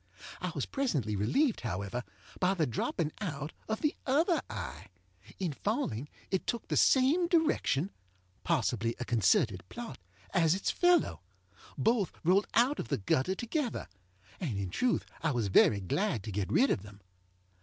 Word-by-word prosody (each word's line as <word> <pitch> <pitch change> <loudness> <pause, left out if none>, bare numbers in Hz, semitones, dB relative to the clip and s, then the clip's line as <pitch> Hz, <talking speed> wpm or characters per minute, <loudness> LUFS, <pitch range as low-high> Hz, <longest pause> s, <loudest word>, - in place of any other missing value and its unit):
I - - -2
was - - -1
presently 150 - -1
relieved, 220 - +1
however, 100 +2 -3 0.4
by 185 +1 +2
the 165 -4 +2
dropping 150 +6 -1
out 150 -5 -4 0.2
of 220 - -1
the 300 - +1
other 320 +6 +3
eye. 70 +9 -6 0.5
In 180 -6 -2
falling 150 - -2 0.2
it 190 - -1
took 235 - -2
the - - 0
same 280 +7 +4
direction 315 - +2 0.5
(possibly 120 -7 0
a 125 - -3
concerted 105 -3 +2
plot) 240 - -7 0.3
as 165 0 +4
its 195 - 0
fellow. 355 0 +3 0.6
Both 225 -5 +2
rolled 185 +5 +3
out 255 +5 +4
of - - -3
the - - 0
gutter 130 - +1
together, 240 - -2 0.5
and 135 - -2
in 95 -2 -3
truth 250 - +1 0.2
I 160 - +1
was 120 -7 0
very 100 +2 +5
glad 120 - -1
to 110 - -5
get 100 0 -2
rid 270 - +4
of - - 0
them. 100 0 -13
165 Hz, 155 wpm, -31 LUFS, -, 0.6 s, very